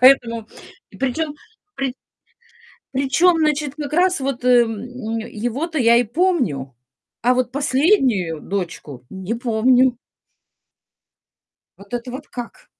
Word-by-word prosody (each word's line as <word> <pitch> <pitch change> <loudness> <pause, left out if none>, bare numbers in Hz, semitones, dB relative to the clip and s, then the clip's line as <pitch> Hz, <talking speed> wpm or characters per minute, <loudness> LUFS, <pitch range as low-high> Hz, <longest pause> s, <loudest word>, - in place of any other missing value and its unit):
поэтому 235 -4 +5 0.4
и - - -14
причём, 290 +4 -1 0.4
при 270 -2 -2 1.0
причём, 280 +7 +3
значит, 300 -2 0
как 295 -1 -5
раз 360 0 +3
вот, 265 -2 -3
эм, 240 -4 +3 0.4
его-то 245 +9 -3
я 235 -3 +5
и 240 - +5
помню. 235 - 0 0.5
А 250 +2 +4
вот 250 -1 0
последнюю 260 - +2
дочку 165 -9 -5
не 190 +3 -4
помню. 245 +2 +3 1.8
Вот 200 +4 -15
это 245 +1 -3
вот 270 +4 -7
как? 245 - -8
250 Hz, 115 wpm, -21 LUFS, 225-285 Hz, 1.8 s, поэтому